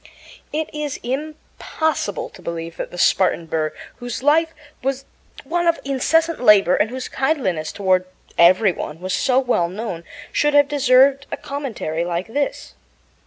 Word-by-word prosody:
It 310 +1 -2
is 300 -2 -4
impossible 300 -2 -3
to - - -14
believe 165 0 -6
that - - -4
the 175 - -10
Spartan 180 -1 +2
Burr, 155 -1 -1 0.3
whose 245 0 -6
life 320 +3 +4 0.3
was 270 +1 -2 0.4
one 345 +4 -1
of 335 - +2
incessant 320 +3 +1
labor 205 -6 +6
and 215 - +1
whose 255 +1 -5
kindliness 240 - -1
toward 185 -2 +1 0.3
every 185 +4 +5
one 155 -2 -6
was 185 +1 -3
so 255 -1 +2
well 245 -10 +2
known, 185 -3 -5 0.3
should 295 0 +1
have 285 -1 +6
deserved 275 0 +4
a - - -3
commentary 240 - -4
like 175 +1 -2
this. 280 +5 -3
255 Hz, 150 wpm, -21 LUFS, 180-290 Hz, 0.4 s, labor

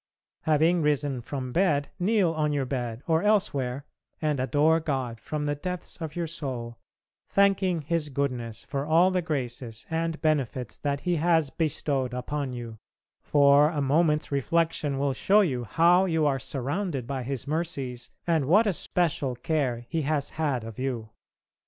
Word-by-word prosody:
Having 160 +3 +3
risen 145 -3 0
from 130 +1 -5
bed, 155 -4 +2
kneel 195 -2 +2
on 155 -2 0
your 140 -2 0
bed, 125 -2 -4
or 160 0 +2
elsewhere, 140 -11 +1 0.3
and 150 -3 0
adore 150 +5 +3
God 130 -7 -3
from 150 +4 -4
the 145 - 0
depths 180 +4 -6
of 155 -2 -5
your 175 -1 -1
soul, 130 -7 -5 0.5
thanking 195 -4 +2
His 160 0 -1
goodness 125 -5 -3
for 140 -2 -3
all 165 +5 +4
the 185 -1 +1
graces 125 -7 -4
and 165 0 -1
benefits 135 -6 -1
that 140 -1 -2
He 175 -1 0
has 160 -3 +2
bestowed 140 -5 -1
upon 135 +2 -3
you, 120 -3 -7 0.4
for 145 0 +5
a 155 -3 -3
moment's 150 +2 +2
reflection 150 0 0
will 140 0 0
show 200 +10 +4
you 130 - -1
how 170 - +4
you 160 -4 +1
are 135 -2 +2
surrounded 140 - -2
by 135 +1 -3
His 130 +1 -4
mercies 140 -6 -3 0.2
and 160 -5 +2
what 200 +11 +5
a 205 - +2
special 150 -6 0
care 125 -3 -1
He 165 - -1
has 145 -1 -1
had 145 -7 -1
of 115 0 -8
you. 120 -4 -3
145 Hz, 160 wpm, -27 LUFS, 130-165 Hz, 0.5 s, for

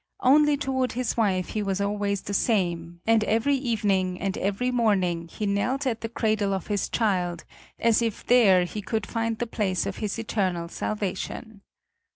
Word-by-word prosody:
Only 295 +2 +5
toward 260 -2 -1
his 245 -1 -2
wife 190 -5 +1
he 215 - -2
was 195 -1 -1
always 200 -1 -1
the 200 - -5
same, 175 -6 0
and 225 -1 +4
every 230 +6 +2
evening 205 -8 0
and 195 -1 -2
every 205 +6 -1
morning 190 -8 +1
he 210 +6 -5
knelt 245 +8 0
at 230 -4 -1
the 225 - -4
cradle 215 -3 0
of 190 - -5
his 205 -2 -1
child 180 -6 0 0.3
as 230 0 +3
if 230 -3 -2
there 205 -7 +5
he 210 +4 -5
could 220 +1 -2
find 225 0 -2
the 240 - -2
place 200 -5 -1
of - - -4
his 210 -1 -3
eternal 185 -6 -1
salvation. 210 +2 -4
210 Hz, 175 wpm, -26 LUFS, 190-230 Hz, 0.3 s, Only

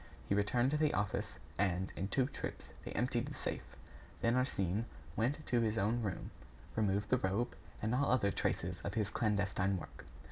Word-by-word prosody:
He - - +2
returned 120 +6 +3
to 150 - +2
the 155 0 +3
office, 100 -1 -1 0.2
and, 95 -2 +1
in 95 - -1
two 130 +6 +2
trips, 140 - -5
they - - -5
emptied - - +1
the - - -6
safe. - - -4 0.5
Then 115 - +3
Arsène 110 -5 +1 0.3
went 140 +7 0
to 120 -1 +3
his 110 -1 +1
own 110 +4 +2
room, 100 -5 -3 0.4
removed 105 -1 +1
the 130 - +5
rope, 100 +6 0 0.3
and 110 +2 +1
all 135 +2 +3
other 100 -6 +4
traces 90 -1 -1
of 100 - -3
his 110 -2 +1
clandestine 100 -3 +1
work. 85 - -9
105 Hz, 180 wpm, -36 LUFS, 100-120 Hz, 0.5 s, the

